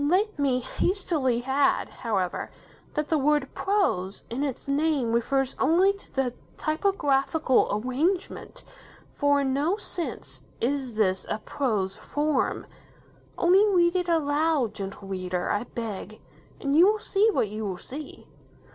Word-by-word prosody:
Let 370 +5 +1
me 260 -3 +2
hastily 295 - 0
add, 270 +2 +2
however, 195 -7 -2 0.5
that 300 0 -1
the 315 - +2
word 290 -1 +1
"prose" 285 - 0
in 245 +4 -2
its 275 -2 -4
name 280 -4 +1
refers 265 +3 +1
only 370 +5 +4
to 400 - -16
the 265 -3 -1 0.2
typographical 310 -5 +2
arrangement, 275 - -2 0.5
for 285 0 +2
in 265 -1 0
no 310 +9 +1
sense 350 -5 -6 0.2
is 260 -1 -1
this 190 -3 +1
a 215 - -1
prose 210 -5 -2
form. 295 -2 -1 0.7
Only 365 +3 +5
read 350 -3 +3
it 360 -1 0
aloud, 300 -5 +1
Gentle 195 0 -7
Reader, 185 -2 -2
I 205 +3 -1
beg, 215 -3 -6 0.4
and 280 0 0
you 345 +4 +7
will 430 +1 +3
see 425 0 +2
what 220 - 0
you 215 +1 -5
will 185 -2 -4
see. 285 +9 -9
280 Hz, 140 wpm, -26 LUFS, 230-330 Hz, 0.7 s, you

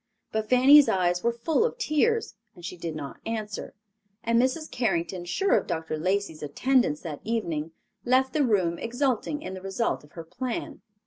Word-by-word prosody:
But 220 -1 -2
Fanny's 275 +3 +7
eyes 180 -1 +1
were 235 - +3
full 265 - +1
of 480 - -1
tears, 455 - +1 0.2
and 175 -2 -11
she 180 - -5
did 165 -2 -5
not 145 -3 -7
answer; 215 -2 -5 0.5
and 230 0 +3
Mrs. 285 +5 -1
Carrington, 180 -6 -1
sure 385 - +2
of - - 0
Dr. 160 -1 -3
Lacey's 185 0 -1
attendance 155 - +1
that 155 -4 -6
evening, 170 -9 -2 0.3
left 260 +1 +2
the 305 - +2
room 185 -8 +1
exulting 255 +3 -1
in 185 - -5
the 185 - -7
result 195 +2 -1
of 150 - -19
her 165 - -7
plan. 240 +9 -5
215 Hz, 175 wpm, -27 LUFS, 170-260 Hz, 0.5 s, Fanny's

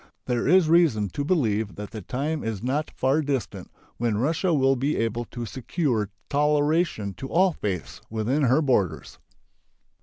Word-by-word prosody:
There 120 -1 -1
is 180 +1 +5
reason 155 - +3
to 145 - -3
believe 110 - 0
that 105 0 -7
the 110 -2 -6
time 145 - -3
is 110 -2 -4
not 145 +5 -1
far 135 +4 +1
distant 140 -4 -3 0.3
when 115 -3 0
Russia 160 - +1
will 135 -3 +3
be 140 +4 -1
able 115 +1 -1
to 120 0 -6
secure 120 - -1 0.2
toleration 150 - +1
to 135 - -6
all 185 +1 +3
faiths 95 - -4
within 115 +7 0
her 130 +6 +3
borders. 95 - 0
130 Hz, 155 wpm, -25 LUFS, 110-150 Hz, 0.3 s, is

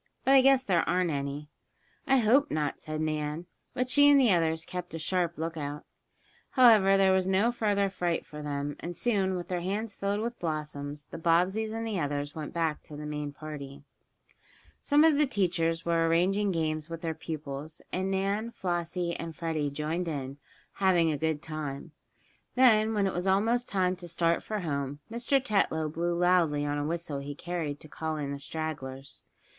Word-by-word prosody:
But 270 - +5
I 270 - +8
guess 270 0 +5
there 180 -8 +2
aren't 180 -1 +2
any." 140 +1 -4 0.6
"I 270 - +5
hope 255 +5 +4
not," 150 -2 -2
said 155 0 -4
Nan, 155 +1 -2 0.3
but 255 0 0
she 285 +1 +6
and 285 -1 +7
the 250 -5 +5
others 165 -1 +1
kept 180 -2 -6
a - - -2
sharp 170 +1 -1
lookout. 155 -2 -4 0.7
However, 215 -7 +6
there 195 -1 +4
was 190 0 +2
no 195 +5 +3
further 205 -4 +1
fright 175 -3 -2
for 150 0 -9
them, 145 -1 -3
and 175 0 -6
soon, 195 -6 +1
with 175 -1 -5
their 180 -1 -2
hands 205 +4 -3
filled 200 +1 -2
with 235 +1 -4
blossoms 150 -3 -4
the - - -9
Bobbseys 180 +7 +2
and 225 +1 -3
the 215 -4 -2
others 145 -1 -2
went 155 -2 -6
back 165 -3 -1
to 150 - -11
the 150 - -6
main 150 -1 -4
party. 145 -2 -8 1.0
Some 295 +1 +4
of 315 -3 +5
the 300 - +4
teachers 170 -7 0
were 165 -1 +2
arranging 190 +5 +2
games 155 -2 -2
with 165 -1 -6
their 165 -1 -2
pupils, 155 -1 -6
and 190 +1 -1
Nan, 200 +4 0
Flossie 175 -3 -2
and 165 -1 -6
Freddie 160 -3 -1
joined 155 +5 -2
in, 140 -3 -4 0.3
having 175 -4 +3
a - - 0
good 160 -1 -1
time. 155 -1 -5 0.6
Then, 225 -4 +5
when 205 -1 +2
it 190 - 0
was 180 +2 -2
almost 225 +6 +2
time 185 -2 +1
to 175 -1 -9
start 170 0 +1
for 215 -2 -4
home, 140 -4 -3
Mr. 240 +4 +2
Tetlow 195 - 0
blew 170 +1 -1
loudly 170 -5 +3
on 145 0 -1
a 145 - -2
whistle 165 -3 -3
he 140 +1 -6
carried 160 -4 -4
to - - -11
call 160 +1 -4
in 145 -2 -3
the 140 - -5
stragglers. 140 -3 -6
170 Hz, 185 wpm, -29 LUFS, 150-195 Hz, 1.0 s, I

